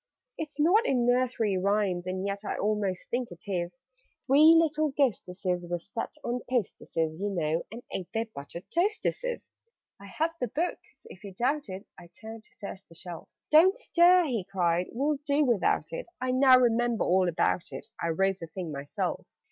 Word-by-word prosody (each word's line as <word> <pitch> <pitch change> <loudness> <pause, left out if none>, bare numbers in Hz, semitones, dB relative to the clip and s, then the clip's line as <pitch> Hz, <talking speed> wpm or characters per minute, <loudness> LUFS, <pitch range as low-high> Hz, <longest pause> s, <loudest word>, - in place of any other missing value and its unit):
"It's 300 -2 -7
not 360 +9 +5
in 250 -3 +2
Nursery 245 -5 +1
Rhymes? 195 -2 0
And 185 +1 -3
yet 200 0 -2
I - - -3
almost 205 -3 -1
think 245 0 -1
it 175 -1 -12
is 175 -3 -2 0.5
'Three 300 +4 +7
little 310 -1 +2
Ghosteses' 180 - -1
were 175 - 0
set 205 - -6
'On 245 +1 -2
posteses,' 165 -9 -2
you 205 +1 -1
know, 165 -4 -1
and 235 +2 -8
ate 180 - -5
Their 225 +1 -1
'buttered 170 -3 -9
toasteses.' 430 +6 -1 0.5
"I 200 - -11
have 320 - -1
the 250 - +1
book; 320 +10 -2 0.2
so, - - -26
if 185 - -14
you 195 -2 -9
doubt 275 +3 0
it 190 +3 -7
" - - -17
I 175 - -13
turned 220 0 -9
to - - -22
search 200 -2 -7
the 165 - -15
shelf. 170 0 -9 0.2
"Don't 360 +8 +6
stir!" 355 -5 +5
he 235 -9 -1
cried. 180 -2 0
"We'll 285 +5 0
do 290 +1 +2
without 240 - +1
it; - - -5
I 255 0 -1
now 260 0 +7
remember 240 -2 +2
all 185 0 +3
about 170 +1 0
it; - - -7
I - - 0
wrote 195 +3 +1
the 165 - -7
thing 175 -1 -6
myself. 140 0 -4
215 Hz, 190 wpm, -28 LUFS, 180-275 Hz, 0.5 s, Three